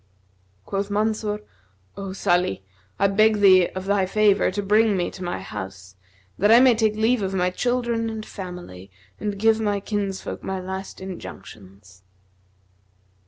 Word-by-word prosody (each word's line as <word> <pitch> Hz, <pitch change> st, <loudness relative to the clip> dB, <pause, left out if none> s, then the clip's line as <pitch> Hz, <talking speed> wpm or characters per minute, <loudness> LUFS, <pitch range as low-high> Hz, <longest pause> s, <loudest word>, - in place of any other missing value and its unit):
Quoth 200 Hz, +1 st, -3 dB
Mansur, 210 Hz, 0 st, -1 dB, 0.5 s
"O 195 Hz, -1 st, -6 dB
Salih, 175 Hz, -, 0 dB, 0.3 s
I 200 Hz, -, +2 dB
beg 215 Hz, +2 st, +3 dB
thee 185 Hz, -3 st, +6 dB
of 185 Hz, 0 st, -4 dB
thy 195 Hz, -1 st, +1 dB
favour 210 Hz, 0 st, +3 dB
to 205 Hz, -, -3 dB
bring 210 Hz, +1 st, +3 dB
me 175 Hz, -, -1 dB
to 185 Hz, -, -9 dB
my 175 Hz, 0 st, -3 dB
house, 95 Hz, -2 st, -8 dB, 0.4 s
that 205 Hz, +3 st, +4 dB
I 230 Hz, -, +9 dB
may 255 Hz, -1 st, +6 dB
take 220 Hz, -2 st, +1 dB
leave 225 Hz, +2 st, +2 dB
of 195 Hz, 0 st, -2 dB
my 180 Hz, -1 st, +1 dB
children 235 Hz, +1 st, -1 dB
and 220 Hz, -1 st, -6 dB
family 180 Hz, -, -9 dB, 0.3 s
and 205 Hz, -1 st, -3 dB
give 220 Hz, +2 st, +3 dB
my 205 Hz, -2 st, 0 dB
kinsfolk 200 Hz, -1 st, -4 dB
my 190 Hz, 0 st, -4 dB
last 190 Hz, +1 st, -7 dB
injunctions." 100 Hz, -, -11 dB
195 Hz, 150 wpm, -23 LUFS, 180-215 Hz, 0.5 s, I